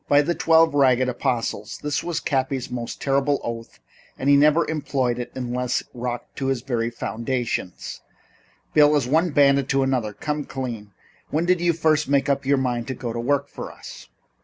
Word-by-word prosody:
"By 145 0 +5
the 175 - 0
Twelve 165 -2 +4
Ragged 130 -3 +4
Apostles!" 115 -3 -2
This 150 0 -1
was 170 -2 -2
Cappy's 130 -3 -1
most 120 -1 -5
terrible 140 +1 +1
oath 115 -1 -6 0.4
and 135 +2 +2
he - - +7
never 150 +3 +4
employed 135 -5 -1
it 120 - -5
unless 125 -1 -2
rocked 120 -1 -5
to 135 - -2
his 135 -3 -1
very 120 -3 -1
foundations. 115 -4 -4 0.7
"Bill, 150 0 +6
as 140 -4 +1
one 160 +6 +2
bandit 140 -2 +3
to 135 0 +2
another 125 -6 0
come 150 +5 -3
clean. 115 -6 -5 0.4
When 160 +3 0
did 180 -1 +2
you 175 0 +3
first 155 -2 +1
make 140 0 +2
up 140 -1 0
your 140 0 +4
mind 125 -2 -1
to 130 - -3
go 120 -3 -5
to 120 - -3
work 140 +3 0
for - - -8
us?" - - -12
135 Hz, 185 wpm, -23 LUFS, 120-145 Hz, 0.7 s, he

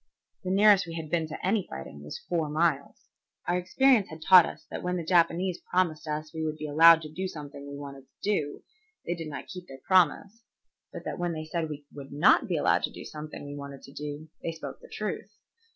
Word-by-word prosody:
The 185 - -3
nearest 200 -1 +5
we 165 - -6
had 160 -2 -6
been 165 -2 +1
to 155 - -6
any 195 0 +1
fighting 65 +2 -8
was 75 - -8
four 165 -4 0
miles. 150 -2 0 0.4
Our 175 - +2
experience 220 +5 +3
had 160 0 -9
taught 185 -1 +8
us - - -9
that - - -4
when 180 0 -1
the 170 - -4
Japanese 175 +1 +2
promised 170 -4 0
us 155 0 -4
we 160 0 -3
would 155 -1 -2
be 155 - -5
allowed 165 +2 +7
to 155 - -8
do 185 +4 -3
something 145 -4 -9
we 140 - -7
wanted 140 -1 -9
to - - -48
do, 155 -9 -1 0.4
they 175 - -1
did 165 -2 -6
not 145 - -6
keep 180 -1 -9
their 135 0 -11
promise; 190 +4 +3 0.5
but - - -8
that - - -4
when 175 -1 -1
they 155 -1 -5
said 160 0 -2
we 145 -1 -7
would 140 -1 -10
not 145 +2 +4
be - - 0
allowed - - +3
to - - -9
do - - -10
something 150 -1 -8
we 145 - -7
wanted 140 -1 -8
to 135 - -13
do, 150 +2 -6
they 165 - -3
spoke 160 - -8
the - - -14
truth. 210 -1 -4
160 Hz, 230 wpm, -28 LUFS, 145-180 Hz, 0.5 s, taught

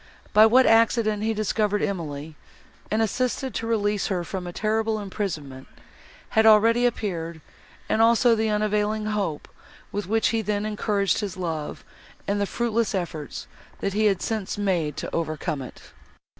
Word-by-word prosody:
By 215 +1 +8
what 255 +3 +5
accident 225 -2 +3
he 220 +1 0
discovered 210 -1 0
Emily, 160 -6 -4 0.6
and 220 +1 +1
assisted 255 +4 -1
to 225 - -3
release 205 -3 0
her 180 -3 -1
from 180 +1 -5
a - - -5
terrible 220 +3 0
imprisonment, 165 -10 -5 0.6
has 220 - +3
already 225 +3 +5
appeared, 170 -8 -3 0.5
and 220 - +2
also 235 +1 +5
the 220 0 +1
unavailing 210 0 0
hope, 200 -8 -2 0.4
with 205 -2 -3
which 225 +2 +2
he 225 -1 0
then 210 0 -1
encouraged 210 -2 0
his 200 -3 -4
love, 160 -4 -4 0.4
and 205 0 0
the 200 - 0
fruitless 230 -1 0
efforts, 165 -5 -4 0.3
that 195 - -2
he 215 +2 +2
had 195 -3 +2
since 215 -4 -3
made 175 -8 0
to - - -4
overcome 155 -2 -2
it. 125 - -11
210 Hz, 155 wpm, -25 LUFS, 185-220 Hz, 0.6 s, By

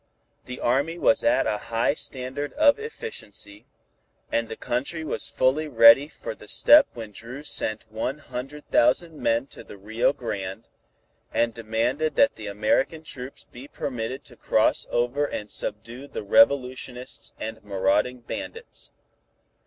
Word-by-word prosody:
The 125 0 -7
Army 140 +7 +1
was 140 - +3
at 295 +1 +3
a 105 - -1
high 115 +4 0
standard 135 0 -4
of 295 +1 +4
efficiency, 105 - -7 0.6
and 115 0 0
the 110 - -6
country 140 +9 -3
was 155 - +3
fully 135 +5 +1
ready 115 +1 +7
for - - -7
the - - -15
step 295 -1 +7
when 110 -3 -7
Dru 125 +7 -7
sent 110 -7 -1
one 120 +6 -3
hundred 145 0 -8
thousand 155 +7 +3
men 115 +3 +1
to - - -10
the - - -12
Rio 110 +6 +1
Grande, 105 -5 -6 0.6
and 115 0 +1
demanded 115 +7 -1
that 280 0 +4
the 105 - -8
American 110 +10 0
troops 130 -3 -6
be 125 +3 -12
permitted 130 0 -5
to - - -10
cross - - +2
over 120 +5 0
and 105 -7 -5
subdue 115 +6 -2
the 110 - -6
revolutionists 125 +3 +2
and 110 0 -6
marauding 105 +5 0
bandits. 295 - -5
125 Hz, 145 wpm, -25 LUFS, 110-145 Hz, 0.6 s, ready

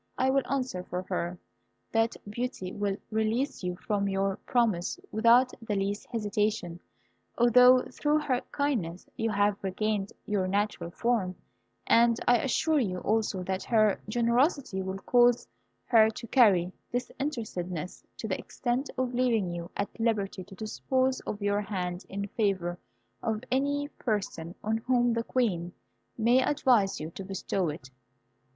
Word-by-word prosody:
I 260 +1 +3
will 275 0 +3
answer 255 -9 -1
for 180 0 -4
her, 175 -1 -3 0.5
that 225 0 +1
Beauty 210 -4 -4
will 205 -2 -1
release 220 +5 0
you 180 0 -2
from 200 +1 -1
your 195 0 0
promise 225 - +1
without 235 +3 +5
the 225 -2 -2
least 200 +1 -2
hesitation, 210 -5 -1 0.6
although, 250 +1 +7
through 300 +1 +1
her 260 -4 0
kindness, 220 - -1
you 225 0 -1
have 205 -1 +1
regained 200 +1 -1
your 200 -3 0
natural 200 -3 -1
form; 195 -2 0 0.5
and 235 0 +4
I 245 -1 +5
assure 300 +5 +2
you 190 -8 -1
also 210 -3 0
that 190 +1 -2
her 215 -3 +3
generosity 240 - +1
will 190 0 -4
cause 240 +3 +3 0.4
her 220 -2 +6
to 225 +2 -7
carry 195 -8 +4 0.2
disinterestedness 220 - -4
to - - -4
the - - -2
extent 250 +3 -2
of 255 -1 -1
leaving 235 -7 +1
you 170 0 -5
at 200 +3 -4
liberty 205 -4 0
to 195 - -13
dispose 260 +5 0
of 205 -1 -4
your 205 0 +1
hand 180 -4 -4
in 200 +1 -3
favour 185 -5 -1 0.4
of 220 0 -2
any 285 +2 +1
person 195 -6 -2
on 220 +1 +1
whom 245 0 +2
the 230 0 -1
Queen 185 -10 -1 0.4
may 240 +3 +4
advise 245 -10 +2
you 155 +2 -5
to 195 - -7
bestow 190 -2 -2
it. 140 -4 -8
215 Hz, 145 wpm, -29 LUFS, 190-245 Hz, 0.6 s, although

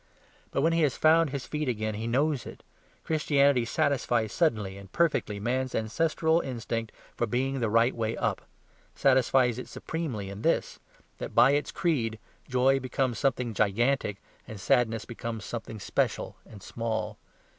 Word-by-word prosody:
But - - -1
when 165 +3 +3
he 165 - +2
has 145 -4 +2
found 160 0 +5
his 135 -1 -4
feet 150 -3 -2
again 110 -2 -2
he 110 +2 -4
knows 140 +3 +1
it. - - -11 0.4
Christianity 140 -5 +3
satisfies 120 -4 0
suddenly 105 - +1
and 100 -1 -12
perfectly 150 -11 +1
man's 130 +4 -1
ancestral 160 +8 +1
instinct 115 -5 -4 0.2
for 120 - 0
being 130 +4 -1
the 115 -3 0
right 115 +3 +3
way 115 -1 -2
up; - - -1 0.5
satisfies 130 -2 +3
it - - -7
supremely 140 -12 -4
in 100 +1 -8
this; - - 0 0.4
that - - -6
by 120 +3 +7
its 145 +1 0
creed 120 -11 0 0.3
joy 130 +2 +3
becomes 130 -1 -1
something 125 -4 0
gigantic 110 +1 +1 0.3
and 110 -4 -8
sadness 115 +2 +1 0.4
something 110 -1 -6
special - - -1
and 100 -4 -13
small. 110 -2 -3
125 Hz, 150 wpm, -28 LUFS, 110-140 Hz, 0.5 s, by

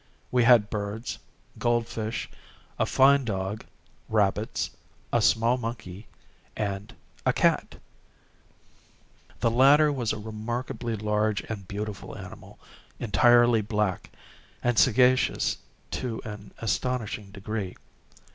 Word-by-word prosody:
We 125 -2 +3
had 115 -4 +6
birds, 105 +2 -4 0.4
gold 120 -1 +2
fish, 110 -1 -4 0.5
a - - +2
fine 140 +1 +5
dog, 100 -2 -3 0.5
rabbits, 105 0 0 0.4
a - - +4
small 115 +3 +3
monkey, 110 -4 -6 0.5
and 100 -1 -3 0.3
a - - +3
cat. - - +1 1.7
This 115 - +3
latter 140 +5 +6
was 120 -5 -1
a - - -3
remarkably 115 +2 -4
large 105 0 0
and 100 -4 -7
beautiful 105 0 -6
animal, - - -11 0.4
entirely 120 +1 +5
black, 105 -3 -1 0.5
and 120 -3 +2
sagacious 130 +4 +3 0.3
to 120 -3 -3
an 105 -1 -8
astonishing 115 -1 -2
degree. 100 -1 -5
110 Hz, 105 wpm, -27 LUFS, 105-120 Hz, 1.7 s, had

